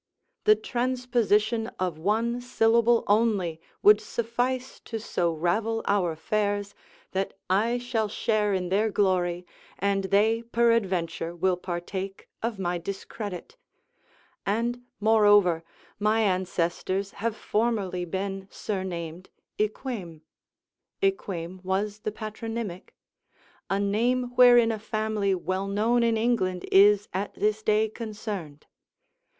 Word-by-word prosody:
The 430 0 +7
transposition 240 - 0
of 180 -4 -2
one 225 +7 0
syllable 235 -1 +3
only 200 -7 +1 0.2
would 210 0 +7
suffice 245 +3 -2
so 195 -7 -2
to - - -11
ravel 220 +7 0
our 195 -4 +2
affairs, 205 +4 -1 0.4
that 190 +1 -2 0.2
I 225 +6 +2
shall 240 -3 -1
share 210 0 0
in 185 -2 -1
their 210 +4 +2
glory, 180 -3 +1 0.3
and 195 0 0
they 215 +4 +3
peradventure 200 -8 0
will 185 +1 +2
partake 185 +2 -5
of 230 -1 -2
my 175 -2 -1
discredit; 200 - -6 0.9
and, 235 +4 -1 0.2
moreover, 205 -6 +4 0.4
my 215 +2 +2
ancestors 185 0 -1
have 230 -1 0
formerly 210 -5 -1
been 190 +2 -4
surnamed, 180 -3 -5 0.3
Eyquem, 210 - -3 0.8
[Eyquem 185 - -1
was 200 +3 -2
the 215 - -3
patronymic.] 215 -3 -6 0.7
a 195 - +1
name 240 +5 +1
wherein 245 -2 +7
a 220 - -3
family 215 -2 -1
well 185 +2 -2
known 220 +4 +2
in 230 -1 +2
England 220 -6 0
is 205 +1 +6
at 195 +2 -3
this 215 +1 0
day 215 0 +2
concerned. 210 -9 -6
205 Hz, 110 wpm, -27 LUFS, 185-225 Hz, 0.9 s, The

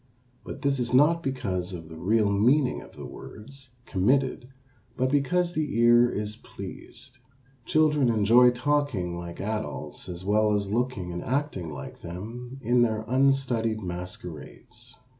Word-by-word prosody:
But 140 - -8
this 140 -1 +1
is 125 0 0
not 160 +5 +5
because 100 - -3
of 80 -2 -7
the 80 - -10
real 105 +4 +2
meaning 125 +7 +3
of - - -14
the - - -8
words 130 +3 -11
committed 125 +5 +1 0.5
but 130 0 +1
because 175 +5 +1
the 150 -7 -2
ear 120 +1 +6
is 105 -1 -4
pleased. 130 +2 -10 0.5
Children 150 -4 +3
enjoy 115 +3 +6
talking 125 -8 0
like 85 0 -7
adults 110 -2 -4
as 90 +1 -7
well 105 +1 +3
as 100 -1 -2
looking 110 -6 -1
and 90 - -5
acting 130 - -2
like 75 - -9
them 115 +9 -7
in 120 +2 +3
their 110 -2 +1
unstudied 130 -4 +1
masquerades. 90 -3 -8
120 Hz, 140 wpm, -27 LUFS, 100-135 Hz, 0.5 s, ear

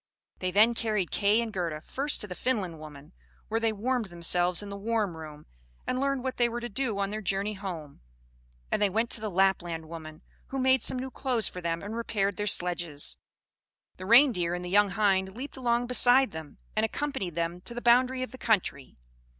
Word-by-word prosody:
They 185 - -1
then 215 +5 +5
carried 215 -6 -1
Kay 205 +3 +3
and 225 -2 -4
Gerda 170 -5 -2
first 275 - 0
to 210 - -4
the 180 - -6
Finland 185 -5 -2
woman, 150 +1 -12 0.4
where 225 +1 0
they 225 -1 +1
warmed 235 +3 -1
themselves 175 +1 +2
in 205 - -8
the 200 - -6
warm 210 -3 -1
room, 155 -2 -10 0.4
and 255 - -1
learned 275 -1 0
what 260 -1 -3
they 240 -1 +3
were 235 +1 -4
to 240 0 -5
do 230 -2 -2
on 200 0 -1
their 215 +1 -4
journey 195 +1 -1
home; 175 -8 -7 0.7
and - - 0
they 205 - +4
went 225 +4 -1
to 215 - 0
the 215 - -2
Lapland 175 -4 +1
woman, 155 -1 -9 0.2
who 270 - -5
made 260 0 +3
some - - +3
new 260 +1 -5
clothes 250 -7 0
for 180 - -6
them 165 +1 -2
and 210 +3 -5
repaired 205 -4 -1
their 210 - -2
sledges. 175 -6 +2 0.8
The 185 - -8
Reindeer 225 -8 +5
and 180 0 -5
the 175 - -6
young 205 +1 +4
hind 190 0 +1
leaped 275 +3 -6
along 240 -2 0
beside 250 0 +4
them, 160 -3 -9 0.2
and 215 - +1
accompanied 225 - -2
them 170 +1 -2
to 235 - -8
the - - -2
boundary 255 +2 +3
of 255 - -6
the 260 - -11
country. 195 - -1
205 Hz, 205 wpm, -28 LUFS, 175-240 Hz, 0.8 s, then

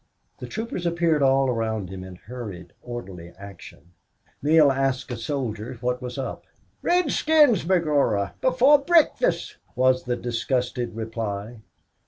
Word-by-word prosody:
The - - -7
troopers 220 -6 -4
appeared 170 -3 +1
all 135 0 +4
around 110 -5 -2
him 95 -1 -7
in 95 -1 -10
hurried 100 -4 -9
orderly 95 -8 -8
action. 100 -3 -13 0.5
Neale 150 -1 +5
asked 135 -1 -1
a - - -2
soldier 120 -1 -4
what 125 +1 -2
was 125 +1 -6
up. 135 - -5 0.4
"Redskins, 305 - +3
b'gorra 145 - +1
before 260 +3 +5
brikfast!" 345 - +2 0.2
was 130 0 +2
the 125 -1 -1
disgusted 120 0 -2
reply. 110 0 -5
125 Hz, 125 wpm, -24 LUFS, 110-155 Hz, 0.5 s, Neale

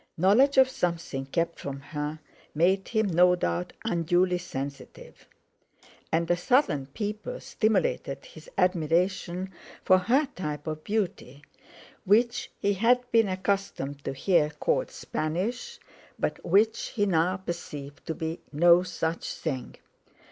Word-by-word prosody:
Knowledge 230 - +4
of 265 -1 +8
something 170 - -3
kept 170 +4 -1
from 140 -1 -5
her 150 +2 -5 0.4
made 190 +5 +2
him, 220 -1 +1
no 180 -1 +5
doubt, 85 - -2
unduly 175 -1 +2
sensitive; 140 -5 -8 0.8
and 165 +1 +1
a - - +4
Southern 180 - +2
people 210 - -5
stimulated 360 - 0
his - - -13
admiration 180 +2 +1 0.3
for 185 0 +5
her 255 +11 +2
type 150 -4 -4
of 155 -1 -4
beauty, 180 - -3 0.6
which 230 +5 +2
he 200 0 +1
had 235 +5 +3
been 225 -2 +4
accustomed 185 -7 -2
to - - -3
hear 155 +2 +2
called 150 -1 -1
Spanish, 215 - -3 0.4
but - - -2
which 220 +5 +2
he 205 -3 +2
now 180 0 +2
perceived 150 -6 -7
to 160 - -2
be 160 +1 -4
no 170 +3 +6
such 165 -2 -3
thing. 130 -3 -4
180 Hz, 125 wpm, -27 LUFS, 155-205 Hz, 0.8 s, of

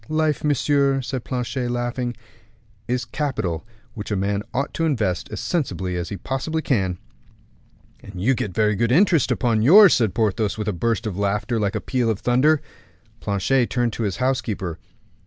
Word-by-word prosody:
"Life, 155 -1 0
monsieur," 140 0 +2
said 130 -1 -4
Planchet, 125 0 -3
laughing, 120 0 -2 0.7
"is 125 0 -1
capital 95 - -2 0.3
which 105 -3 -7
a 105 - 0
man 100 +1 0
ought 135 +3 -2
to 165 - 0
invest 105 - -1
as 110 - -5
sensibly 95 - -2
as 85 -1 -3
he 100 - -5
possibly 155 +7 -3
can." 95 -9 0 1.0
"And 100 -3 -10
you 120 +9 +3
get 105 -5 -3
very 105 +3 +2
good 115 +3 +1
interest 170 +1 +4
for 120 -3 +1
yours," 175 - +7
said 115 -8 +1
Porthos, 110 -1 0
with 105 -1 -4
a 105 - 0
burst 115 +5 -1
of 100 -3 -4
laughter 105 +4 0
like 100 -2 -1
a - - 0
peal 125 -3 0
of 110 -3 -1
thunder. 145 +5 +3 0.6
Planchet 115 +5 +1
turned 120 -3 0
to - - -5
his 100 -4 -1
housekeeper. 110 -10 -2
120 Hz, 175 wpm, -22 LUFS, 100-135 Hz, 1.0 s, yours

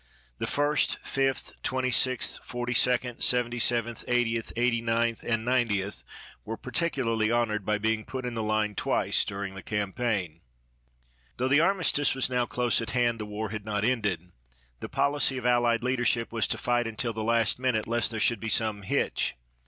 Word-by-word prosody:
The - - -2
First, 145 +1 +1
Fifth, 135 -1 -1
Twenty 130 0 -1
sixth, 130 +1 +2
Forty 120 0 -4
second, 125 0 +2
Seventy 120 -1 +2
seventh, 120 0 +1
Eightieth, 120 -2 0
Eighty 120 -1 +1
ninth, 115 0 0
and 115 -1 -1
Ninetieth 110 -6 0 0.4
were 110 +1 -5
particularly 125 -7 -1
honored 110 -4 0
by 105 -1 +2
being 110 +1 -1
put 130 +3 -6
in 125 - -3
the 115 - -3
line 110 -1 0
twice - - +1
during 100 -1 -5
the 95 - -8
campaign. 100 -5 -2 1.0
Though 130 - 0
the 145 +3 +4
armistice 165 -7 +3
was 130 -1 0
now 125 -1 +1
close 120 -1 +1
at 115 - -4
hand 120 -1 +1
the 105 - -5
war 105 +1 -4
had 110 0 -5
not 105 0 -1
ended. 100 -8 -1 0.5
The - - -6
policy 140 -2 +1
of 125 - -6
allied 120 -1 +2
leadership 120 -2 0
was 110 -4 0
to - - -1
fight 120 -1 0
until 115 +1 -2
the 110 0 -4
last 115 +1 +2
minute 125 -4 0
lest 120 0 +1
there 110 -1 -4
should 115 +1 +2
be 115 - -4
some 110 -2 +1
hitch. 95 - -1
115 Hz, 175 wpm, -27 LUFS, 110-125 Hz, 1.0 s, the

